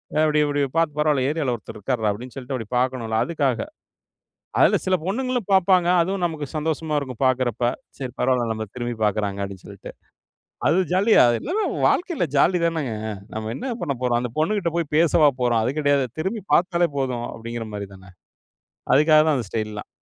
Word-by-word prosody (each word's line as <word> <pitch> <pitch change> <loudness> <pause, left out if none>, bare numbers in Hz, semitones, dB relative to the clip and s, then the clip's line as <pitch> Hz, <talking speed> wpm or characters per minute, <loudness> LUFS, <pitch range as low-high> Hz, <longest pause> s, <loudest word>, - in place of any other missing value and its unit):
அ - - +1
அப்டி 150 0 +2
இப்டி 145 0 0 0.2
பாத்து, 165 -3 +1
"பரவால்ல, 150 -4 +2
ஏரியாவுல 150 -5 -1
ஒருத்தர் 110 - -11
இருக்காருடா" 110 0 -1
அப்டின்னு 120 +5 -8
சொல்ட்டு 135 0 -5
அப்டி 115 -4 -7
பாக்கணும்ல, 125 -3 -1
அதுக்காக. 145 -7 0 1.0
அதுல - - +5
சில 185 - +2
பொண்ணுங்களும் 245 +2 -2
பாப்பாங்க. 185 -2 +4
அதுவும் 190 +2 -2
நமக்கு 160 -4 -2
சந்தோஷமா 155 0 -1
இருக்கும் 130 -3 -6
பாக்குறப்ப. 125 -2 0 0.4
"சரி 130 -2 -5
பரவால்ல 125 -2 +1
நம்பள 110 -1 -3
திரும்பிப் 120 -2 -4
பாக்கிறாங்க" 100 -1 -1
அப்டின்னு 95 -2 -9
சொல்லிட்டு. - - -10 0.8
அது 155 - +3 0.2
ஜாலியா 200 +4 +5 0.2
எல்லாமே 405 +9 -1 0.2
வாழ்க்கைல 345 - 0
ஜாலி 180 +6 +4
தானேங்க. 155 -9 -1 0.4
நம்ம 110 0 -4
என்ன 255 - -4
பண்ணப் 140 -7 -3
போறோம்? 120 -1 +1
அந்த 125 -2 -4
பொண்ணுகிட்ட 175 +1 0
போயி 170 -2 -1
பேசவா 160 -2 +5
போறோம், 120 -2 +2
அது 125 +4 -1
கெடையாது. 145 -2 +2
திரும்பி 195 +7 -2
பாத்தாலே 175 -1 +3
போதும். 125 -3 -2
அப்டிங்கிற 115 0 -6
மாரி 100 -1 -5
தானே? 95 0 -15 0.8
அதுக்காக 155 +2 +6
தான் 155 -2 +3
அந்த 125 - -2
ஸ்டைல்லாம். 110 -2 -4
140 Hz, 170 wpm, -23 LUFS, 120-165 Hz, 1.0 s, அதுக்காக